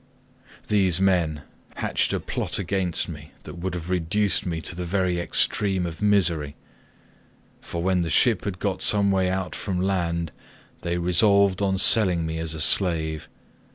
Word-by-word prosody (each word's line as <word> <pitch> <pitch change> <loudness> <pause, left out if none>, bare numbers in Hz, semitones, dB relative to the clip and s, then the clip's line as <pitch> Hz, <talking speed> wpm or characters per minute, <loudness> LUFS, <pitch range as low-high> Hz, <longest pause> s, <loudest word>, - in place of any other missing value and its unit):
"These 95 -5 +2
men 85 -6 +1 0.3
hatched - - -1
a - - -1
plot - - -3
against 95 -2 -2
me 75 -3 -10
that 85 - -10
would 90 0 -4
have 90 +1 -6
reduced 95 +3 0
me 85 -2 -2
to 85 - -5
the 90 - -4
very 90 0 -1
extreme 95 +1 0
of 85 -2 -7
misery, 90 -8 +1 1.1
for 85 0 -5
when 95 -1 +1
the 85 - -2
ship 115 -2 +2
had 100 -3 -3
got 95 -1 -3
some 100 -1 +3
way 95 -1 +1
out 95 -1 -3
from 95 -3 -3
land 85 -4 -1 0.5
they 85 0 -2
resolved 95 +2 +3
on 95 -1 +1
selling 95 -5 +4
me 80 0 -4
as 80 -1 -2
a - - -6
slave. 80 -3 +2
90 Hz, 160 wpm, -24 LUFS, 85-95 Hz, 1.1 s, selling